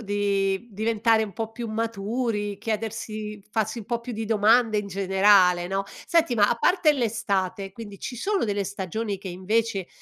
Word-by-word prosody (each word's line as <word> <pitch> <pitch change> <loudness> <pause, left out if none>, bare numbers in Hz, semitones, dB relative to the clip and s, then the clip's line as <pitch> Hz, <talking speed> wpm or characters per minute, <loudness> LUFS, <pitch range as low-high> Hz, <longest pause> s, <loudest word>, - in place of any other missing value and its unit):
di 200 -1 0
diventare 220 +1 +2
un 200 -3 -10
po' 225 +2 -4
più 235 0 -5
maturi, 215 -1 -2
chiedersi 215 -1 -4
farsi 220 +1 -1
un - - -10
po' 235 +2 -2
più 235 0 -6
di 220 +1 -3
domande 220 +1 +3
in 205 - -3
generale, 190 -2 +4
no? 195 +2 -1 0.2
Senti, 330 -6 +3
ma, 205 -2 +4
a - - +2
parte 340 +4 +3
l'estate, 205 -6 -1
quindi 205 -1 -10
ci 245 - -6
sono 390 - 0
delle 205 -1 -1
stagioni 200 +2 -3
che, 190 - -8
invece, 195 +2 -1
215 Hz, 170 wpm, -25 LUFS, 200-230 Hz, 0.2 s, generale